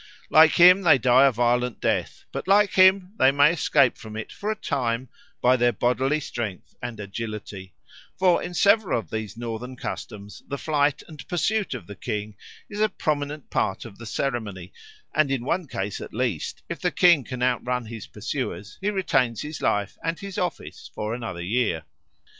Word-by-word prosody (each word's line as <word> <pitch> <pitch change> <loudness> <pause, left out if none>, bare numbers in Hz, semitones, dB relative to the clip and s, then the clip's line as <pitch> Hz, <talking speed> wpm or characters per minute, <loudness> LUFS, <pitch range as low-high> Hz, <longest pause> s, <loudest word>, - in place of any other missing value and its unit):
Like 160 0 +7
him 180 +2 +7
they 165 -6 +6
die 130 +2 +5
a - - +3
violent 120 0 0
death, - - -1
but - - -5
like 205 +1 +5
him 185 0 +5
they 130 - +6
may 145 +2 +5
escape 140 -6 +2
from 110 -1 -8
it 110 - -6
for 205 - -5
a 215 - 0
time 125 - -2 0.3
by 125 +1 +5
their 120 -1 +3
bodily 130 +5 +1
strength 115 -9 -6
and 120 -3 -6
agility; 105 -2 -7 0.4
for 185 -2 +3
in 180 - -6
several 205 - +3
of 110 -8 -6
these 110 -1 -5
northern 120 +2 -5
customs 105 -4 -7
the 140 - -4
flight 145 -1 0
and 155 -3 -11
pursuit 195 0 0
of 125 - -8
the 100 - -9
king 105 +2 -4 0.3
is 205 - -7
a 215 - +3
prominent 145 -3 -3
part 95 - -1
of 110 -3 -12
the 115 - -8
ceremony, 105 -8 -3 0.4
and 155 -2 +2
in 135 -3 -2
one 170 +3 -1
case 100 -5 -4
at - - -9
least 115 -10 -2
if - - -5
the - - +2
king 170 -6 +4
can 125 0 -5
outrun 125 0 0
his 110 -2 -8
pursuers 110 -2 -5
he 200 - 0
retains 130 - 0
his 150 +1 -7
life 100 -1 0
and 165 +1 -2
his 200 -1 -7
office 180 -4 -5
for 105 +1 -3
another 115 -8 -5
year. 100 -5 0
125 Hz, 180 wpm, -25 LUFS, 110-155 Hz, 0.4 s, Like